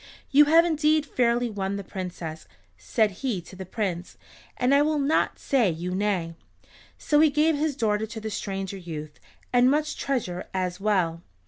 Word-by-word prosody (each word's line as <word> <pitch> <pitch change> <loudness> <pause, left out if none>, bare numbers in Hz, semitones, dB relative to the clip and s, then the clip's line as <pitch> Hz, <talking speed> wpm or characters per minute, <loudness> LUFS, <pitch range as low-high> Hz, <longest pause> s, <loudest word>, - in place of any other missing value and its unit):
"You 295 +1 +7
have 325 +3 +6
indeed 310 -2 +2
fairly 240 -3 +1
won 200 -3 -3
the 200 - -5
Princess," 180 -4 -6 0.3
said 220 -4 +1
he 250 -8 -1
to 180 - -13
the 190 -1 -8
Prince, 185 -4 -4 0.4
"and 250 +2 +2
I 280 - +5
will 305 +1 +1
not 285 +2 +1
say 250 -8 +2
you 175 +2 -4
nay." 185 -4 -1 0.6
So 295 - +2
he 310 0 +6
gave 300 +2 +2
his 295 -1 -1
daughter 220 -3 0
to 225 0 -7
the 220 0 -5
stranger 195 -1 -4
youth, 155 -4 -8 0.3
and 245 +1 +5
much 305 +2 0
treasure 205 -10 -2
as 180 -1 -2
well. 185 -5 0
215 Hz, 175 wpm, -26 LUFS, 185-280 Hz, 0.6 s, You